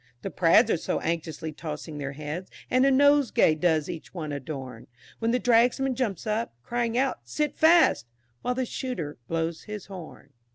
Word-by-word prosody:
The -, -, -4 dB
prads 180 Hz, +7 st, +4 dB
are -, -, +2 dB
so -, -, -2 dB
anxiously 160 Hz, -1 st, -3 dB
tossing 150 Hz, -1 st, -7 dB
their 140 Hz, -1 st, -4 dB
heads, 155 Hz, +5 st, -6 dB, 0.2 s
And 255 Hz, +2 st, +4 dB
a -, -, +4 dB
nosegay 285 Hz, -, +4 dB
does 155 Hz, -1 st, +1 dB
each 165 Hz, +2 st, -8 dB
one 155 Hz, -4 st, -4 dB
adorn, 135 Hz, -2 st, -6 dB, 0.3 s
When 230 Hz, -, 0 dB
the 245 Hz, -, +3 dB
Dragsman 245 Hz, +3 st, +3 dB
jumps 225 Hz, -9 st, -2 dB
up, 215 Hz, -, -2 dB
crying 235 Hz, -, -1 dB
out 265 Hz, 0 st, +1 dB
"sit 295 Hz, -, -2 dB
fast," 320 Hz, -, +5 dB, 0.3 s
While 250 Hz, -, -1 dB
the 260 Hz, 0 st, -1 dB
shooter 185 Hz, -, -5 dB
blows 165 Hz, 0 st, -2 dB
his 210 Hz, -2 st, -7 dB
horn. 185 Hz, -5 st, -11 dB
185 Hz, 170 wpm, -27 LUFS, 155-250 Hz, 0.3 s, fast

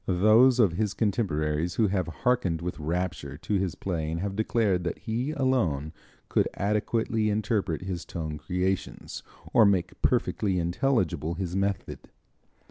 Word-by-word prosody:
Those 110 Hz, +7 st, +5 dB
of 105 Hz, -7 st, +5 dB
his 100 Hz, +3 st, -1 dB
contemporaries 85 Hz, -7 st, 0 dB
who 110 Hz, -, +3 dB
have 95 Hz, -2 st, 0 dB
harkened 90 Hz, -1 st, 0 dB
with 85 Hz, -3 st, -5 dB
rapture 80 Hz, -3 st, -3 dB
to 90 Hz, -, -4 dB
his 95 Hz, -3 st, -2 dB
playing 80 Hz, -3 st, -3 dB
have 95 Hz, +2 st, -3 dB
declared 105 Hz, -4 st, +1 dB
that 85 Hz, -, -3 dB
he 120 Hz, +5 st, -2 dB
alone 115 Hz, -, 0 dB, 0.3 s
could -, -, +2 dB
adequately 110 Hz, +1 st, 0 dB
interpret 105 Hz, -5 st, -1 dB
his 90 Hz, -2 st, -4 dB
tone 80 Hz, -3 st, -5 dB
creations, 95 Hz, +3 st, -3 dB, 0.3 s
or 115 Hz, -, +7 dB
make 95 Hz, -4 st, +1 dB
perfectly 95 Hz, -3 st, +1 dB
intelligible 85 Hz, -, 0 dB
his 90 Hz, 0 st, -3 dB
method. 100 Hz, -1 st, -1 dB
95 Hz, 135 wpm, -27 LUFS, 85-110 Hz, 0.3 s, or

